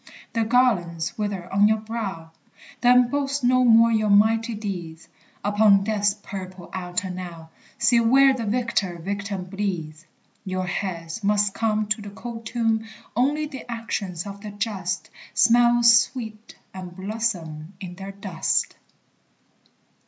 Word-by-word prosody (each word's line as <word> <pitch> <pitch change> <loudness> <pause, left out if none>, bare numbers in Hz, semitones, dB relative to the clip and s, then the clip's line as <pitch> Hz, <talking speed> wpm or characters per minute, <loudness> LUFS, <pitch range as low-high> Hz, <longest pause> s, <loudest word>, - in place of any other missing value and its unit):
The 230 - +1
garlands 180 -9 +1
wither 205 -4 -3
on 200 +2 +5
your 220 +1 +3
brow, 210 -7 -5 0.5
Then 245 0 +5
boast 280 -1 -1
no 255 +1 +4
more 230 -1 +6
your 215 -2 +1
mighty 220 +3 +3
deeds; 175 -6 -6 0.4
Upon 205 -1 +4
death's 205 -1 +1
purple 190 -4 -9
altar 180 0 -3
now 170 -3 -8 0.3
See 240 0 +4
where 265 +4 +5
the 235 -4 -4
victor 210 -6 0
victim 200 +2 -4
bleeds: 180 -5 -4 0.4
Your 185 -2 -3
heads 180 +1 -4
must 205 0 +2
come 215 -1 0
To 215 0 0
the 205 - -8
cold 225 +2 -8
tomb; 225 -2 0 0.3
Only 290 +6 +1
the 270 -4 -9
actions 205 -6 -4
of 200 0 -8
the 210 - -7
just 200 -3 -3 0.2
Smell 240 +1 +5
sweet, 230 -1 +2 0.2
and 180 -2 -8
blossom 190 -6 -3
in 180 -2 -7
their 195 +2 -8
dust. 195 -4 -1
205 Hz, 135 wpm, -24 LUFS, 185-230 Hz, 0.5 s, more